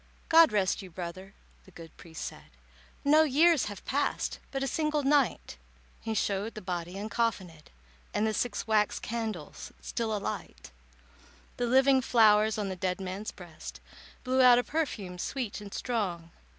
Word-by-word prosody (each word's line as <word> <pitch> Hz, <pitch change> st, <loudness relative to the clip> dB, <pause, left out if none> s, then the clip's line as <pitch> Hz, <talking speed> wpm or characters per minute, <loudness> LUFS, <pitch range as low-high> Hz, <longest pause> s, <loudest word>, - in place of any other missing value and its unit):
"God 330 Hz, -1 st, +7 dB
rest 200 Hz, -1 st, +1 dB
you, 190 Hz, -, -10 dB
brother," 185 Hz, +3 st, -8 dB, 0.3 s
the -, -, -16 dB
good 165 Hz, -3 st, -13 dB
priest 165 Hz, -2 st, -8 dB
said, -, -, -9 dB, 0.6 s
"No 305 Hz, +2 st, +6 dB
years 315 Hz, +1 st, +4 dB
have 205 Hz, -2 st, -8 dB
passed—but 275 Hz, -1 st, -2 dB
a -, -, 0 dB
single 305 Hz, +2 st, 0 dB
night." 280 Hz, -2 st, +1 dB, 0.4 s
He 225 Hz, -1 st, -4 dB
showed 200 Hz, +2 st, -1 dB
the 215 Hz, -, -6 dB
body 175 Hz, -1 st, -4 dB
uncoffinèd, 195 Hz, -6 st, -2 dB, 0.4 s
And 210 Hz, -, 0 dB
the 220 Hz, -, 0 dB
six 220 Hz, -2 st, -2 dB
wax 215 Hz, -2 st, +2 dB
candles 220 Hz, -8 st, -5 dB
still 220 Hz, -3 st, -2 dB
alight. 60 Hz, -, -6 dB, 0.9 s
The 245 Hz, -, 0 dB
living 265 Hz, +2 st, +5 dB
flowers 220 Hz, -3 st, +4 dB
on 210 Hz, -2 st, -2 dB
the 190 Hz, -, -4 dB
dead 180 Hz, 0 st, -2 dB
man's 190 Hz, +3 st, -5 dB
breast 175 Hz, -4 st, -10 dB, 0.4 s
Blew 260 Hz, 0 st, +2 dB
out 250 Hz, -1 st, +8 dB
a 245 Hz, -, +2 dB
perfume 215 Hz, -, -3 dB
sweet 235 Hz, -1 st, -4 dB
and 205 Hz, -1 st, -9 dB
strong. 185 Hz, -10 st, -3 dB
215 Hz, 150 wpm, -29 LUFS, 185-255 Hz, 0.9 s, out